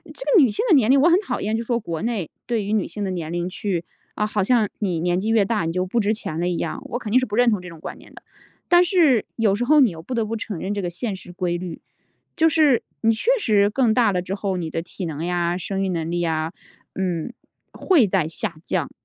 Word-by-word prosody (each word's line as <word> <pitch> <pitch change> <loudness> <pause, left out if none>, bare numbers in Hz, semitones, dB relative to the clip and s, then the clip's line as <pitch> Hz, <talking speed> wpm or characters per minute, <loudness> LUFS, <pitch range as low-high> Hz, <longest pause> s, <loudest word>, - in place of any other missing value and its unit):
这 - - -7
个 445 -7 +5
女 260 - +5
性 210 - -2
的 - - +7
年 250 -5 +4
龄 275 - +6
我 290 +5 +5
很 350 +3 +5
讨 420 - -3
厌， 215 +2 -1
就 230 - -2
说 235 0 0
国 170 -7 -5
内 220 -8 -2 0.2
对 230 -4 -1
于 205 - -3
女 215 -3 +1
性 210 - -5
的 190 - -2
年 170 -4 -4
龄 175 0 -2
去， 180 -3 -3 0.3
啊， 210 - 0
好 210 -1 -1
像 225 +2 +3
你 185 -5 -1
年 175 +1 +1
纪 215 - -3
越 225 -2 +4
大， 210 -4 -1
你 165 - -1
就 185 +1 0
不 230 +6 0
值 215 +1 +1
钱 165 -7 -5
了 175 - 0
一 175 - -1
样， - - -3
我 240 - -3
肯 220 -4 -6
定 255 +4 +5
是 255 - -2
不 210 - -4
认 245 0 +5
同 210 -4 0
这 180 - -9
种 165 -2 -11
观 - - -7
念 - - -17
的。 - - -13 0.5
但 350 0 +6
是 330 - +3
有 220 -4 +2
时 220 - -2
候 300 +2 +6
你 255 -6 +5
又 165 -2 -9
不 250 - -5
得 230 -2 +1
不 220 +1 -4
承 215 -4 -5
认 190 +5 -3
这 205 - -2
个 180 - -2
现 195 +5 -4
实 185 -1 -10
规 175 -1 -2
律， 175 -2 -7 0.5
就 325 -1 +4
是 305 -6 +3 0.2
你 225 0 +4
确 325 - 0
实 205 - +3
更 230 +1 +2
大 230 -2 +3
了 180 -2 -1
之 185 +2 -4
后， 195 -2 -2
你 165 -3 -4
的 165 - -2
体 175 +3 -7
能 160 -2 -4
呀， 175 0 0
生 195 +1 -3
育 190 - 0
能 165 -2 -2
力 175 0 -1
呀， 160 -1 -1 0.4
嗯， 185 +3 -2 0.4
会 315 - +3
在 155 - +1
下 160 +1 -4
降。 170 -7 -2
205 Hz, 295 characters per minute, -22 LUFS, 175-235 Hz, 0.5 s, 的